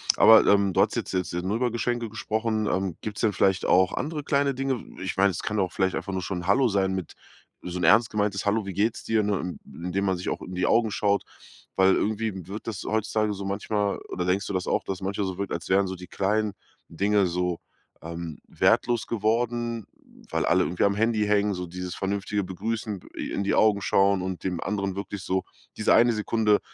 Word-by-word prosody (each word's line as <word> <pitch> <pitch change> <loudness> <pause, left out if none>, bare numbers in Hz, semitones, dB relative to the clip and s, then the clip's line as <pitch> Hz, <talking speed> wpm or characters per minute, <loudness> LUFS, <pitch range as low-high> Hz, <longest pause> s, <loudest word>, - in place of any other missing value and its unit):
aber, 110 -1 +8
ähm, 100 -1 +4
du - - -1
hast - - +3
jetzt - - -3
jetzt 90 -2 -2
ja 90 - -1
nur 100 +5 -1
über 120 -1 0
Geschenke 120 0 -1
gesprochen. 110 0 -1
Ähm, 95 -2 -1
gibt's 105 -2 -5
denn 105 -3 +2
vielleicht 95 0 +2
auch 95 +1 +4
andere 150 0 -3
kleine 140 0 +1
Dinge? 135 +1 -1
W - - -11
ich 95 - -3
meine, 100 0 +4
es 85 - -5
kann 105 0 -1
auch 95 -2 0
vielleicht 95 -1 +1
einfach 100 - -4
nur 95 - -1
schon 95 - -3
'n - - -7
Hallo 125 +5 +4
sein 95 -2 +1
mit 95 -4 -5 0.5
so 90 0 -4
'n - - -3
ernst 110 +7 +5
gemeintes 105 -2 -1
„Hallo, 105 0 +1
wie 95 - -5
geht's 110 +4 0
dir“, 110 -1 +1
ne? 95 -3 -2
Indem 90 +4 -3
man 95 -1 +1
sich 90 - -4
auch - - -3
in 90 - -7
die 90 - 0
Augen 115 -2 +3
schaut, 100 -1 +1 0.5
weil 95 0 +5
irgendwie 105 -4 -2
wird 105 +4 -7
das 105 -4 -4
heutzutage 110 -1 0
so 100 0 -6
manchmal 100 +1 -1
oder 90 - -3
denkst 95 +2 +1
du - - -4
das 90 -1 -1
auch, - - +1
dass 95 - -3
es - - -24
manchmal 100 +1 -2
so 95 -1 -5
wirkt, 100 - -3
als 85 - -4
wären 95 +1 +3
so 95 - -4
die 90 0 -10
kleinen 105 +1 0 0.4
Dinge 100 +4 +2
so, 90 0 -1 0.4
ähm, 85 -1 -6
wertlos 120 -2 +2
geworden, 115 0 -1 0.4
weil - - 0
alle - - +3
irgendwie 90 - -1
am 100 0 +2
Handy 110 0 +1
hängen, 105 0 +2
so 90 0 -4
dieses 90 +1 -6
vernünftige 100 +1 -2
begrüßen, 105 +2 -3 0.2
i - - -4
in 100 - -1
die 100 - +1
Augen 105 -2 +4
schauen 95 +1 +3
und 95 -1 -4
dem 90 -3 -2
anderen 100 -2 -2
wirklich 100 0 -5
so 95 0 0 0.3
diese 110 - +3
eine 120 +1 +5
Sekunde 105 -1 +2
100 Hz, 225 wpm, -26 LUFS, 95-110 Hz, 0.5 s, aber